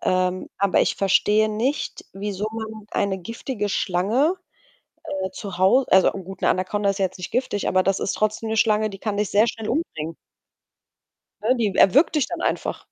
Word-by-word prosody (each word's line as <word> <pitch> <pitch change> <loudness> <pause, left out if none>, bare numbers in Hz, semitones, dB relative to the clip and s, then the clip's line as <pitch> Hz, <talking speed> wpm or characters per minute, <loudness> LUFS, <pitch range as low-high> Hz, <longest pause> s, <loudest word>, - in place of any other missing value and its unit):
ähm, 185 0 0
aber 200 -1 +3
ich - - +1
verstehe 210 +2 +3
nicht, 245 +7 -2
wieso 200 +1 -4
man 220 -1 -7
eine 190 -1 0
giftige 220 +2 -4
Schlange, 210 - +1 0.9
äh, 190 - -3
zu 190 -1 -7
Hau 200 +8 +4
also 190 0 +6
a - - +2
gut, 190 0 -9
'ne - - +3
Anakonda 200 +2 0
ist 195 - -3
jetzt 190 -1 -1
nicht 180 - -6
giftig, 240 -5 -1
aber 185 0 +3
das 195 0 0
ist - - -1
trotzdem 215 +1 -1
'ne 220 - -1
Schlange, 215 -1 +2
die 195 - -9
kann 210 -1 -3
dich 210 -1 -1
sehr 210 +3 +4
schnell 225 -2 -5
umbringen 165 - -3 1.3
ne? 255 - +4
Die 210 -5 0
erwürgt 280 - +5
dich 285 - +2
dann 345 -1 -5
einfach. - - -2
205 Hz, 185 wpm, -23 LUFS, 190-225 Hz, 1.3 s, also